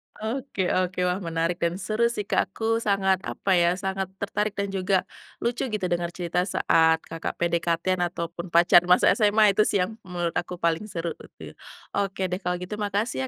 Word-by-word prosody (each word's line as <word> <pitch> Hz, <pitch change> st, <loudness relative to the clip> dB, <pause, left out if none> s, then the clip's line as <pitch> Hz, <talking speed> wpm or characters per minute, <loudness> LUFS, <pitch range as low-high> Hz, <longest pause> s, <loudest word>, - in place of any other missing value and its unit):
Oke 220 Hz, -4 st, -2 dB
oke. 185 Hz, 0 st, 0 dB
Wah, 180 Hz, +1 st, 0 dB
menarik 165 Hz, 0 st, -1 dB
dan 170 Hz, +2 st, 0 dB
seru 220 Hz, +4 st, 0 dB
sih 210 Hz, -3 st, -4 dB
Kak. -, -, +1 dB
Aku 225 Hz, +3 st, -1 dB
sangat, 190 Hz, -3 st, +1 dB
apa 195 Hz, -, -3 dB
ya, 175 Hz, 0 st, +3 dB
sangat 190 Hz, 0 st, -2 dB
tertarik 205 Hz, +1 st, -2 dB
dan 200 Hz, 0 st, -1 dB
juga 190 Hz, 0 st, +1 dB, 0.4 s
lucu, 245 Hz, +2 st, -1 dB
gitu, 215 Hz, -4 st, -2 dB
dengar 175 Hz, -1 st, -1 dB
cerita 175 Hz, 0 st, -2 dB
saat 160 Hz, -3 st, +3 dB
Kakak 165 Hz, 0 st, -5 dB
PDKT-an 170 Hz, +1 st, 0 dB
ataupun 170 Hz, +1 st, -6 dB
pacar 170 Hz, +1 st, +6 dB
masa 180 Hz, -, +6 dB
SMA, 210 Hz, -2 st, +4 dB
itu 215 Hz, -, +3 dB
sih, 205 Hz, -, +1 dB
yang 200 Hz, -, -4 dB
menurut 175 Hz, -4 st, -3 dB
aku 180 Hz, +1 st, -3 dB
paling 170 Hz, +3 st, 0 dB
seru. 170 Hz, -2 st, -3 dB, 0.8 s
Oke 195 Hz, -1 st, -2 dB
deh, 180 Hz, +1 st, -2 dB
kalau 180 Hz, -1 st, -1 dB
gitu 180 Hz, +4 st, -6 dB
makasih 200 Hz, -, -1 dB
185 Hz, 175 wpm, -25 LUFS, 170-205 Hz, 0.8 s, pacar